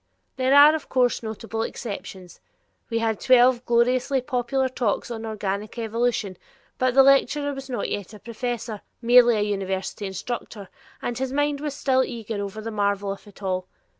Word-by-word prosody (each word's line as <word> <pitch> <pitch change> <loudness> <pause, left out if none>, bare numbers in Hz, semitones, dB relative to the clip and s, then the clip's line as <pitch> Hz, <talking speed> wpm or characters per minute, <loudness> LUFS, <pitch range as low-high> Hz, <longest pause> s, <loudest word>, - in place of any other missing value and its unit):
There 260 +1 +2
are, 290 +2 +9
of 315 - -4
course, 250 -2 +2
notable 225 0 -5
exceptions; 195 -5 -7 0.5
we 230 - -1
had 225 -2 0
twelve 250 -1 +5
gloriously 250 +3 +2
popular 255 0 -1
talks 245 -2 -2
on 225 -1 -5
organic 210 0 -4
evolution, 225 -4 -1 0.4
but 255 -1 +1
the 270 - +8
lecturer 285 +1 +3
was 270 -1 -8
not 245 - -2
yet 200 -3 -4
a 215 - -11
professor 230 -1 -5 0.2
merely 240 -1 +6
a - - +1
university 195 -1 -2
instructor 200 +1 -6 0.3
and 240 0 -3
his 265 -1 -2
mind 290 0 0
was 295 -2 -3
still 260 -2 +2
eager 225 -4 -5
over 200 +2 -6
the 225 +1 -5
marvel 200 -1 0
of 200 +2 -9
it 205 0 -15
all. 185 -1 -2
235 Hz, 165 wpm, -24 LUFS, 205-255 Hz, 0.5 s, are